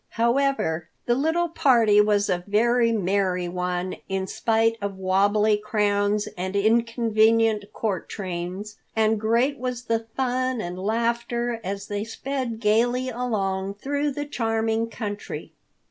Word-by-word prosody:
However, 235 - +1 0.2
the 240 - +3
little 320 +7 +1
party 230 -9 +4
was 210 -1 +2
a 175 0 -1
very 230 +3 +3
merry 190 -3 0
one 180 +1 -3
in 190 0 -1
spite 225 +3 +1
of 200 -1 -3
wabbly 205 +3 +3
crowns 205 -1 0
and 185 +2 -4
inconvenient 225 -1 +2
court 200 -6 -3
trains. 185 +2 -5 0.2
And 220 -1 +2
great 235 +6 +2
was 250 -1 -3
the 230 -1 -1
fun 255 -1 0
and 180 -2 -5
laughter 235 +3 -1
as 195 +1 -4
they 205 0 -3
sped 240 0 -4
gaily 240 +4 +2
along 200 -6 -2
through 285 +5 -1
the 290 +2 -4
charming 225 -3 -1
country. 205 -3 -6
220 Hz, 130 wpm, -24 LUFS, 200-235 Hz, 0.2 s, party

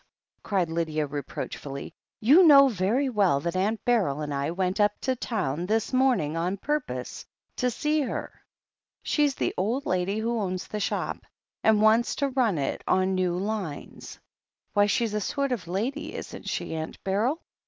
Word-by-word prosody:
cried 190 -5 0
Lydia 160 -2 -1
reproachfully, 140 -1 -6 0.3
"you 280 - +6
know 280 -4 +8
very 230 +5 +1
well 200 - +2
that 170 +4 -3
Aunt 210 +4 0
Beryl 195 - +2
and 145 -1 -3
I 140 +1 -1
went 185 +3 -1
up 205 0 +4
to 260 - 0
town 180 - -2
this 220 +4 0
morning 255 - +2
on 175 +4 -1
purpose 225 - -3 0.3
to 250 - +1
see 300 +5 0
her. 270 - -4 0.7
She's 290 -3 +1
the - - -1
old 230 +9 -1
lady 185 +3 0
who 230 +1 -1
owns 185 -3 -3
the 210 - -4
shop, 200 - -2 0.4
and 215 -1 +4
wants 220 +2 +4
to 280 - 0
run 250 -9 +1
it 140 -2 -2
on 185 0 +2
new 180 -1 0
lines. 195 -6 -5 0.5
Why, 205 -1 +4
she's 230 0 0
a 210 - -1
sort 275 +6 -1
of 220 -9 -2
ladj^ 230 - -3
isn't - - -7
she, - - -3
Aunt 160 0 -5
Beryl?" 220 - 0
205 Hz, 165 wpm, -26 LUFS, 175-245 Hz, 0.7 s, know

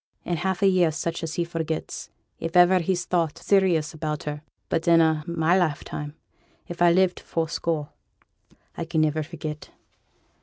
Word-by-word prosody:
In 175 - -1
half 190 +3 -1
a - - +6
year 180 -4 +4
such 165 +2 -3
as 165 -1 -4
he 175 - +1
forgets, 165 -2 -4 0.3
if 165 +2 -1
iver 180 +1 +6
he's 175 0 -1
thought 170 -4 0
serious 180 -6 +2
about 155 -1 -3
her; 150 0 -5 0.3
but 165 0 -1
in 170 -1 +6
a' 160 -1 +3
my 170 0 +2
lifetime, 150 -3 -2 0.5
if 175 0 -8
I 175 -1 +6
live 185 +1 +3
to - - -13
fourscore, 160 -2 -2 0.9
I - - -3
can 165 -1 0
niver 155 0 +1
forget. 155 -1 -7
165 Hz, 165 wpm, -25 LUFS, 155-175 Hz, 0.9 s, a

